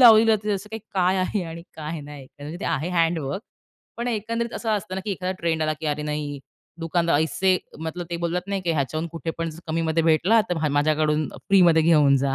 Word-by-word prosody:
लावलेली 225 -2 +8
असते 210 0 0
असं 200 +1 -4
काही 220 - -5
काय 185 0 +3
आहे 185 +1 0
आणि 165 0 -7
काय 155 +1 -5
नाही 145 -1 -10
तर 145 - -17
म्हणजे 155 +4 -6
ते - - -4
आहे 160 0 -1
हँडवर्क 165 - 0 0.5
पण 235 +1 -2
एकंदरीत 230 +1 -2
असं 225 - -2
असतं 205 -2 -1
ना, 190 - -2
की 210 - -2
एखादा 185 0 -2
ट्रेंड 160 -2 0
आला 155 - +1
की 160 - -3
अरे, 150 0 -1
नाही 150 -1 -3 0.4
दुकानदार 165 -2 +2
ऐसे 185 +4 +2 0.2
मतलब 165 +2 -5
ते 170 - -1
बोललात, 170 +1 -1
नाही 200 -1 -1
की 170 - 0
ह्याच्याहून 155 +2 -1
कुठे 165 -1 -3
पण 165 0 -1 0.2
कमीमध्ये 165 0 +1
भेटला, 170 +8 +4
तर 180 - +2
म्ह 155 -2 0
माझ्याकडून 155 0 +2 0.2
फ्रीमध्ये 175 -5 +6
घेऊन 150 -4 +5
जा 135 0 +1
165 Hz, 215 wpm, -24 LUFS, 155-190 Hz, 0.5 s, लावलेली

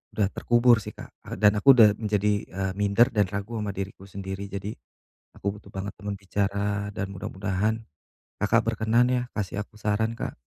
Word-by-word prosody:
udah 105 -2 +2
terkubur 120 -1 +4
sih 105 - -8
Kak - - -10 0.2
a - - -5
dan 105 -1 +4
aku 135 +5 +7
udah 110 -4 +8
menjadi, 105 -1 +1
eee, 95 0 -3
minder 105 +5 +4
dan 105 -4 +2
ragu 100 +4 -4
ama 105 -1 -2
diriku 95 0 -6
sendiri, 95 0 -6
jadi 100 +1 -5 0.6
aku 100 +1 -3
butuh 105 - -16
banget 95 +1 -4
teman 100 +1 -4
bicara 100 +1 -1
dan 100 -1 -3
mudah-mudahan 100 +3 -2 0.6
Kakak - - +4
berkenan 115 +3 +3
ya 125 -1 +2
kasih 100 -1 -2
aku 105 +1 -20
saran 110 +2 0
Kak. - - -4
105 Hz, 175 wpm, -26 LUFS, 100-110 Hz, 0.6 s, udah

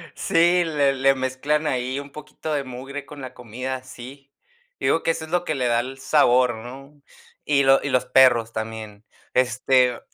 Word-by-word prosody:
Sí, 175 +1 +3
le 145 -4 +1
le 135 0 +3
mezclan 130 +4 -1
ahí 130 +1 -2
un 140 0 -10
poquito 150 +1 -7
de 140 -1 -1
mugre 135 +2 -8
con 145 -1 -11
la 130 -1 -8
comida, 125 +2 -6
sí. 130 +2 -12 0.5
Yo - - -4
digo 165 - +2
que 165 - +2
eso 160 - -5
es 160 - -15
lo 175 0 +1
que 155 - -2
le 125 -2 0
da 120 0 +2
el 130 +2 -5
sabor, 125 -4 +3
¿no? 135 +5 -11 0.4
Y 140 -2 +2
lo 135 0 +5
y 140 - -2
los 125 -1 +1
perros, 125 -3 +4
también. 110 -1 -7 0.3
Este 125 0 +2
130 Hz, 190 wpm, -23 LUFS, 125-145 Hz, 0.5 s, lo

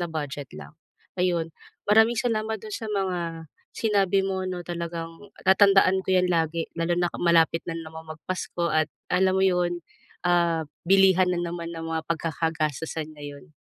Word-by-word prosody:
na 175 - -1
budget 145 -3 -5
lang. 70 -1 -11 0.5
Ayon, 170 -3 +1 0.4
maraming 220 +3 +5
salamat 220 -2 0
dun 215 -1 -7
sa 225 - -5
mga 175 -5 -2 0.3
sinabi 200 -3 +2
mo, 190 -1 -2
'no, 180 -1 -4
talagang 170 -1 -4 0.4
tatandaan 190 -1 +5
ko - - -2
yan 185 0 +4
lagi, 165 -1 0
lalo 165 +1 +1
na 175 - +2 0.2
malapit 165 -1 +4
na 165 - -4
naman 160 0 -9
mag-Pasko 175 +1 -3
at 155 0 +2 0.2
alam 185 +1 +3
mo 190 - +3
'yon, 175 -2 +1 0.5
ah, 170 -2 +2 0.2
bilihan 190 -1 +5
na 180 - 0
naman 170 -1 -4
ng 165 - -6
mga 160 0 -2
pagkaka-gastusan 160 -1 -2
ngayon. 145 +3 -10
175 Hz, 155 wpm, -26 LUFS, 160-190 Hz, 0.5 s, maraming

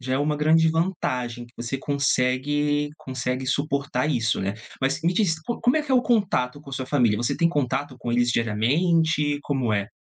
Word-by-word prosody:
já 130 0 -4
é 130 - +1
uma 150 +1 0
grande 160 +2 +4
vantagem, 130 -8 -1
que 120 - -19
você 120 +3 -3
consegue 145 +1 0
consegue 130 -1 -3
suportar 140 -1 -1
isso, 115 -8 0
né. 100 +2 -2 0.3
Mas 135 +2 0
me 170 +2 +2
diz, 170 -5 +1
co 235 - -4
como 245 +5 +3
é 310 - +2
que 290 - -9
é - - +4
o 250 - +5
contato 180 - +1
com 140 - -12
sua 130 -1 -4
família? 125 -6 +2
Você 120 +2 -1
tem 170 - +3
contato 145 -3 -2
com 120 -1 -3
eles 120 0 +2
diariamente? 145 - +1
Como 130 -6 -1
é? 100 0 -1
140 Hz, 200 wpm, -24 LUFS, 125-160 Hz, 0.3 s, o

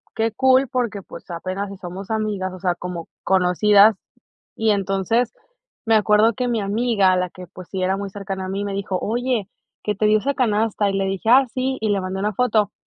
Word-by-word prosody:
qué 225 0 0
cool, 260 +3 +4
porque, 235 -6 -2
pues, - - -12
apenas 185 +4 -4
si 200 - -9
somos 185 +2 -8
amigas, 210 -4 -2
o 185 - -9
sea, 180 -1 +1
como 175 -2 -6 0.2
conocidas, 200 +3 +5 0.6
y 220 -1 +2
entonces, 200 +4 0 0.5
me 225 - +2
acuerdo 215 +1 +4
que 250 +3 -2
mi 225 -3 0
amiga, 200 -2 +2
la 180 0 -1
que, 180 +1 -11
pues, 180 +1 -12
sí 190 -1 -3
era 190 +1 +1
muy 200 -1 -5
cercana 195 -2 -5
a 185 - -5
mí, 200 +1 -3
me 200 - -3
dijo: 195 -1 -2
"Oye, 240 -2 -1 0.4
que 210 - 0
te 215 +2 +1
dio 215 0 +5
esa 280 +6 -1
canasta", 215 -3 +1
y - - -2
le 195 - 0
dije: 195 +3 -2
"Ah, 265 +3 +7
sí", 260 +1 -1
y 220 - 0
le 200 -2 +1
mandé 185 +1 -4
una 210 +2 -1
foto. 220 -2 +1
205 Hz, 215 wpm, -21 LUFS, 190-225 Hz, 0.6 s, Ah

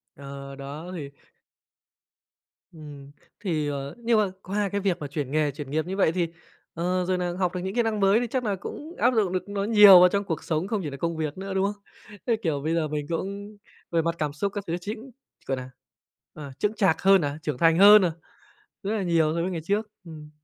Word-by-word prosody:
Ờ, 140 0 -9
đó 145 +6 -8
thì 150 -6 -6 1.6
Ừm. 145 -4 -11 0.3
Thì, 160 -7 -1
ờ, 140 +1 -4
nhưng 235 -1 +1
mà 200 -3 +1
qua 200 +1 -1
cái 200 +1 -2
việc 190 -3 0
mà 145 - -5
chuyển 140 -2 -4
nghề, 150 -1 +1
chuyển 145 0 -8
nghiệp 155 +1 0
như 190 +2 -4
vậy 190 - +3
thì, 175 0 0 0.5
ờ, 180 +2 -1
rồi 185 0 0
nà 175 -1 -2
học 180 -1 0
được 180 - -1
những 190 +1 -4
kỹ 240 - +3
năng 220 -2 -1
mới 195 +2 +4
thì 245 - -2
chắc 255 +2 -2
là 205 -3 0
cũng 305 - -8
áp 245 +2 +3
dụng 210 -6 +1
được 185 +2 -3
nó 200 -1 -2
nhiều 205 -3 +9
vào 180 0 +7
trong 200 +1 0
cuộc 165 -5 -4
sống 165 +3 -1
không 215 -3 -1
chỉ 150 - -3
là 140 - -7
công 165 +2 -2
việc 155 +1 -3
nữa, 195 0 -5
đúng 190 +1 +1
không? 205 - -26 0.4
Thế, 235 - +3
kiểu, 150 -5 -1
bây 160 +3 -1
giờ 160 -2 0
mình 150 -1 -3
cũng 200 +4 -5 0.3
về 165 -1 +2
mặt 170 +1 -1
cảm 150 -2 -2
xúc 200 +7 -2
các 205 - -4
thứ 165 - -1
chính, 220 +7 -7 0.4
gọi 135 - 0
nà, 130 0 -8 0.6
à, 145 -3 -9
chững 210 +1 0
chạc 190 -6 +1
hơn 195 0 +5
nè, 145 -2 -1
trưởng 150 -4 -2
thành 165 +2 +4
hơn 205 +1 +9
nè, 175 - +1 0.7
rất 200 - -3
là 205 - -1
nhiều 165 -3 +2
so 170 - -1
với 180 - -1
ngày 170 -3 -3
trước. 210 +4 -1 0.2
Ừm. 155 -3 -11
180 Hz, 240 wpm, -25 LUFS, 155-200 Hz, 1.6 s, nhiều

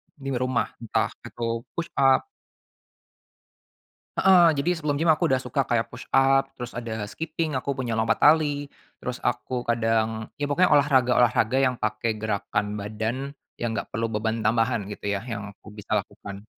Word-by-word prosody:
di 135 -2 -5
rumah, 125 -2 0
entah 115 -2 -1 0.2
aku 115 0 -3
push-up. 140 - +2 1.9
Heeh, 175 -5 +6
jadi 175 0 0
sebelum 150 -2 -1
gym 160 +2 +3
aku 155 - +2
udah 130 -1 +1
suka 125 +2 -1
kayak 115 -1 0
push-up, 135 +2 +2
terus 125 0 -6
ada 115 -3 -4
skipping, 160 +7 -3
aku 140 +2 -3
punya 120 -4 -2
lompat 115 0 +1
tali, 145 -2 +4 0.3
terus 125 0 -4
aku 125 +1 -2
kadang 115 -1 0
ya 145 - -1
pokoknya 170 +4 +3
olahraga-olahraga 130 -4 +4
yang 130 -2 +2
pakai 110 0 -1
gerakan 105 -1 -2
badan 110 +7 -4 0.2
yang 115 -1 -2
enggak - - -4
perlu 115 +1 -1
beban 110 +1 -1
tambahan 115 -1 +1
gitu 105 0 -4
ya, 100 - 0
yang 105 -4 -6
aku 100 - -22
bisa 105 -1 -11
lakukan. 100 +1 -9
120 Hz, 150 wpm, -25 LUFS, 110-140 Hz, 1.9 s, Heeh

